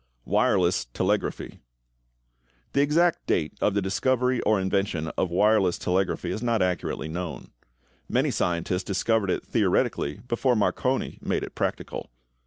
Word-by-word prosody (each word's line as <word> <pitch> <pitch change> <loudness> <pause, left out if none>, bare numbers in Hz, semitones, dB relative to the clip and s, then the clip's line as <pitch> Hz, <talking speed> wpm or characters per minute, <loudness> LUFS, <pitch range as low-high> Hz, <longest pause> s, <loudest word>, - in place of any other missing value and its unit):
=Wireless 90 -2 +2
Telegraphy.= - - -2 1.1
The 140 - +3
exact 165 +4 +2
date 80 -2 0
of 105 - +2
the 100 - +1
discovery 125 +5 +1
or 105 -1 +2
invention 95 -4 -1
of 95 - -1
wireless 95 0 +3
telegraphy 95 +1 -1
is 110 - -3
not 115 -2 +1
accurately 90 -3 -2
known. 80 -3 -6 0.6
Many - - +2
scientists 90 +2 -1
discovered 100 +1 0
it - - -1
theoretically 70 +1 0
before 125 +1 +1
Marconi 130 +5 0
made - - -1
it - - -7
practical. - - -3
100 Hz, 130 wpm, -26 LUFS, 90-115 Hz, 1.1 s, The